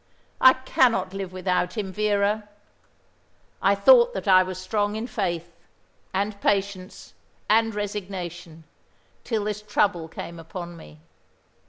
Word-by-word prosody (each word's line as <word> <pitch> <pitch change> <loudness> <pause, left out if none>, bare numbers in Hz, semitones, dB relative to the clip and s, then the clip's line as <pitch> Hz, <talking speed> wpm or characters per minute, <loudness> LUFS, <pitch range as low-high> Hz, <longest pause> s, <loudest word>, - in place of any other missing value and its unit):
I 260 0 +9
cannot 240 -7 +1
live 195 -2 -5
without 185 +2 -1
him, 195 -3 -3
Vera. 210 0 0 1.1
I - - +4
thought - - +6
that - - -5
I 185 -1 +7
was 185 -1 -4
strong 205 +2 -1
in 220 +2 -3
faith, 170 -7 -3 0.6
and 200 +1 -2
patience, 195 -2 -2 0.3
and 225 0 +3
resignation, 180 -5 -6 0.6
till 220 -4 -1
this 210 0 -3
trouble 205 -5 0
came 170 +1 -8
upon 175 +1 -8
me. 75 - -14
195 Hz, 125 wpm, -24 LUFS, 180-210 Hz, 1.1 s, I